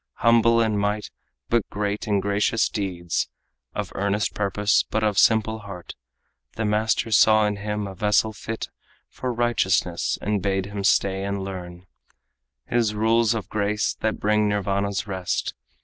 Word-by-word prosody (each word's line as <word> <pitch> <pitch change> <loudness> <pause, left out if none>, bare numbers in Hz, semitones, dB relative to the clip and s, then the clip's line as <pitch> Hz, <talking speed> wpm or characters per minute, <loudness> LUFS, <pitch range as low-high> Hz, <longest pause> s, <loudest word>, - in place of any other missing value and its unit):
Humble 115 0 +4
in 110 -2 +1
mind 105 +1 -1 0.4
but 115 -3 +1
great 105 +1 -3
in 100 -2 +2
gracious 100 +2 +1
deeds, 90 -4 -2 0.5
Of - - -3
earnest 100 +1 0
purpose 105 0 +2
but 110 0 -2
of 105 -2 +2
simple 110 +2 +3
heart, 100 -4 -9 0.6
The 110 - -2
master 110 +2 +1
saw 110 0 +5
in 105 -1 -1
him 105 0 -3
a 95 - -6
vessel 105 +3 +1
fit 110 +1 -5 0.4
For 130 - -4
righteousness, 105 -7 +1
and 105 -1 -1
bade 95 0 0
him 100 0 -5
stay 95 0 +2
and 100 0 -2
learn 90 -2 -7 0.8
His 115 -3 0
rules 115 +1 +3
of 110 - -4
grace 105 0 0
that 110 -1 -1
bring 105 0 +2
Nirvana's 100 +1 -1
rest. 95 -3 -2
105 Hz, 150 wpm, -24 LUFS, 100-110 Hz, 0.8 s, saw